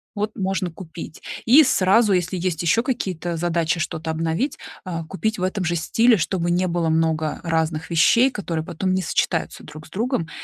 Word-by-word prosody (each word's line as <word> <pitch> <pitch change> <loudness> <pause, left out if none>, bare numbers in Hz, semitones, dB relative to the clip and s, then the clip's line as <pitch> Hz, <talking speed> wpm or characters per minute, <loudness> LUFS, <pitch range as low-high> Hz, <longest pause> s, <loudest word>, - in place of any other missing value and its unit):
Вот, 210 +1 -2
можно 190 -2 -1
купить". 165 -2 -10 0.2
И 270 +7 +8
сразу, 200 0 +3
если 180 0 0
есть 175 -2 -2
ещё 170 +7 +3
какие-то 185 - -3
задачи 170 0 0
что-то 160 +1 -4
обновить, 165 - -1 0.3
а, 165 -2 -4
купить 205 +6 -2
в 180 - -4
этом 190 0 -1
же 175 +1 0
стиле, 225 +8 +3
чтобы 175 -1 -1
не 180 +1 +1
было 170 -1 0
много 160 -1 0
разных 160 -1 -1
вещей, 230 +10 +4
которые 170 -7 -3
потом 185 +4 -2
не 190 - +1
сочетаются 165 -1 -1
друг 155 +1 -11
с - - -20
другом. 220 -5 -2
175 Hz, 180 wpm, -22 LUFS, 160-195 Hz, 0.3 s, И